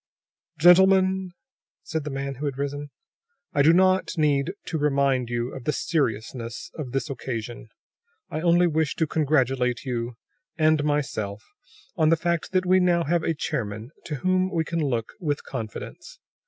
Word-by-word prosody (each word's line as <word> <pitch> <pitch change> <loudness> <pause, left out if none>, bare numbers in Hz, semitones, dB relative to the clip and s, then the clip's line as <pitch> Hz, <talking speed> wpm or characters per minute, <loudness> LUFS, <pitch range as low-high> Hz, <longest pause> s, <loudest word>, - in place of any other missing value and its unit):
"Gentlemen," 190 +1 +5 0.5
said 160 -2 -3
the - - -3
man 135 0 -3
who 140 +3 -6
had 140 -2 -3
risen, 145 +1 -4 0.6
"I 145 - +3
do 155 +3 +6
not 185 +1 +3
need 150 0 +2
to 160 - -3
remind 135 -4 +1
you 120 +1 -2
of 130 - -8
the - - +2
seriousness 115 - -2
of 145 -6 -6
this 135 +3 -1
occasion. 120 -4 -5 0.6
I 155 - -4
only 175 +1 +4
wish 160 -2 0
to 160 - +1
congratulate 135 -5 +1
you, 120 -2 -3 0.4
and 155 -2 +3
myself, 120 -9 -2 0.5
on 155 -2 +4
the 165 - +4
fact 170 0 -1
that 185 -1 +1
we 185 +1 +4
now 175 -2 +3
have 170 +2 +1
a 165 0 -1
chairman 110 -3 -4
to 155 - -3
whom 185 +5 +1
we 170 -4 0
can 165 0 -1
look 120 -5 -2
with 150 -6 -2
confidence. 115 -5 -7
150 Hz, 160 wpm, -25 LUFS, 125-170 Hz, 0.6 s, do